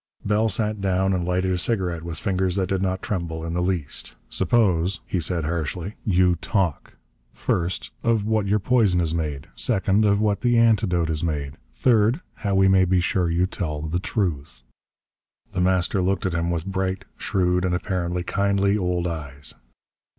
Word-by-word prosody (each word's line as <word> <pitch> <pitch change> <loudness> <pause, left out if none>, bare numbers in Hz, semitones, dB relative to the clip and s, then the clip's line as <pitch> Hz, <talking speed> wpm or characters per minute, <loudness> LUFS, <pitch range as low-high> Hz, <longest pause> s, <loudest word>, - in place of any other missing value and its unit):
Bell 110 +2 +2
sat 105 -1 0
down 95 0 +1
and 90 -2 0
lighted 90 +1 0
a 90 - +1
cigarette 90 -5 0
with 85 -1 -5
fingers 95 -1 0
that 95 -2 0
did 95 -1 0
not 95 -1 -1
tremble 85 -5 -3
in 85 - -4
the 90 - 0
least. 90 -5 -3
"Suppose," 95 - +1
he 90 - -2
said 85 0 0
hardly, 85 +4 -3
"you 90 -3 +3
talk. 90 -2 -1 0.4
First, 85 +1 -2
of 115 -3 +1
what 110 -2 +1
your 105 +2 +3
poison 105 -3 +3
is 80 -2 0
made. 75 -4 -3
Second, 100 +2 +1
of 100 -1 +3
what 105 -1 +1
the 120 -1 +3
antidote 105 -8 +3
is 75 0 -1
made. 75 -4 -2 0.2
Third, 110 - +3 0.2
how 100 -3 -1
we 95 0 +5
may 95 -1 +5
be 90 0 +2
sure 90 0 +1
you 85 +2 +2
tell 75 -6 -4
the 80 +3 -1
truth." 75 - -3 0.9
The 90 - -1
Master 95 +1 +2
looked 95 +1 0
at 90 - 0
him 85 +1 0
with 85 -1 -2
bright, 95 -1 -2
shrewd, 90 -1 0
and 90 -1 +1
apparently 90 -1 -2
kindly 100 +1 +1
old 90 -2 -1
eyes. 75 -4 -5
90 Hz, 175 wpm, -24 LUFS, 85-100 Hz, 0.9 s, we